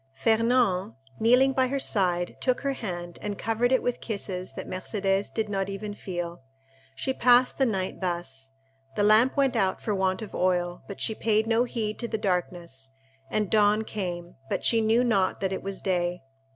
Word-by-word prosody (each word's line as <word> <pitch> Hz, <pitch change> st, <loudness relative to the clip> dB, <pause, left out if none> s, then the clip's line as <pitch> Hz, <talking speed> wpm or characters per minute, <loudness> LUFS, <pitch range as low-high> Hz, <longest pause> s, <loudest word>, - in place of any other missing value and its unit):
Fernand, 225 Hz, -, +2 dB, 0.2 s
kneeling 250 Hz, +4 st, +5 dB
by 260 Hz, 0 st, +2 dB
her 275 Hz, +2 st, -1 dB
side, 180 Hz, -7 st, +1 dB
took 255 Hz, -1 st, +1 dB
her 275 Hz, -1 st, 0 dB
hand, 175 Hz, -8 st, -6 dB
and 205 Hz, -1 st, -4 dB
covered 225 Hz, +3 st, 0 dB
it 260 Hz, -, +3 dB
with 245 Hz, -, -1 dB
kisses 190 Hz, -4 st, -3 dB
that -, -, -7 dB
Mercédès 195 Hz, +1 st, -1 dB
did 220 Hz, -1 st, -1 dB
not 195 Hz, -1 st, -2 dB
even 205 Hz, +1 st, -5 dB
feel. 175 Hz, -5 st, -5 dB, 0.5 s
She 265 Hz, -, -1 dB
passed 250 Hz, +1 st, +4 dB
the 265 Hz, -, +4 dB
night 190 Hz, -4 st, -2 dB
thus. 135 Hz, -8 st, -3 dB, 0.4 s
The 205 Hz, -, +1 dB
lamp 220 Hz, +6 st, +5 dB
went 275 Hz, -3 st, +2 dB
out 190 Hz, -4 st, +1 dB
for 215 Hz, -, -2 dB
want 190 Hz, +1 st, 0 dB
of 210 Hz, -, -9 dB
oil, 180 Hz, -1 st, 0 dB
but 200 Hz, -, -8 dB
she 220 Hz, -, 0 dB
paid 220 Hz, 0 st, +1 dB
no 230 Hz, +2 st, +2 dB
heed 220 Hz, -3 st, -3 dB
to 235 Hz, -, -2 dB
the 220 Hz, -, -2 dB
darkness, 175 Hz, -9 st, -2 dB, 0.4 s
and 210 Hz, +4 st, 0 dB
dawn 210 Hz, 0 st, +4 dB
came, 180 Hz, -5 st, -5 dB
but -, -, -2 dB
she 230 Hz, -1 st, +4 dB
knew 225 Hz, +3 st, +3 dB
not 200 Hz, -6 st, +1 dB
that 190 Hz, -1 st, -1 dB
it -, -, -3 dB
was 195 Hz, 0 st, -6 dB
day. 175 Hz, -2 st, -1 dB
205 Hz, 185 wpm, -27 LUFS, 180-230 Hz, 0.5 s, kneeling